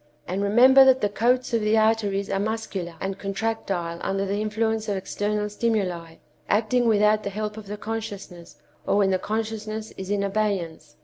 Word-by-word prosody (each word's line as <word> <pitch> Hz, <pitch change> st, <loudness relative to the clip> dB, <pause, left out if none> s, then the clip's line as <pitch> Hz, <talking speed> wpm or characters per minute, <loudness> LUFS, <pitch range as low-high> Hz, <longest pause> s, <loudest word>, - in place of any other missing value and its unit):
And 190 Hz, +2 st, -2 dB
remember 250 Hz, +7 st, +7 dB
that 260 Hz, -1 st, +5 dB
the 205 Hz, -, +1 dB
coats 245 Hz, +4 st, +1 dB
of 230 Hz, -, +2 dB
the 215 Hz, +1 st, +2 dB
arteries 215 Hz, -3 st, +1 dB
are 195 Hz, -, 0 dB
muscular 205 Hz, -5 st, -3 dB
and 195 Hz, +1 st, -4 dB
contractile 195 Hz, -4 st, -3 dB
under 195 Hz, 0 st, -1 dB
the 200 Hz, +2 st, -2 dB
influence 220 Hz, 0 st, -1 dB
of 200 Hz, -, 0 dB
external 210 Hz, +2 st, -2 dB
stimuli, 195 Hz, -7 st, -2 dB, 0.3 s
acting 235 Hz, +3 st, +2 dB
without 210 Hz, -1 st, +4 dB
the 200 Hz, -, -4 dB
help 210 Hz, +1 st, -4 dB
of 215 Hz, -2 st, -10 dB
the 210 Hz, +1 st, -5 dB
consciousness, 205 Hz, -6 st, -7 dB, 0.3 s
or -, -, +2 dB
when 195 Hz, -2 st, +3 dB
the 185 Hz, -, +1 dB
consciousness 220 Hz, +1 st, -4 dB
is 190 Hz, 0 st, -6 dB
in 200 Hz, -1 st, 0 dB
abeyance. 190 Hz, -7 st, -2 dB
210 Hz, 175 wpm, -24 LUFS, 195-220 Hz, 0.3 s, remember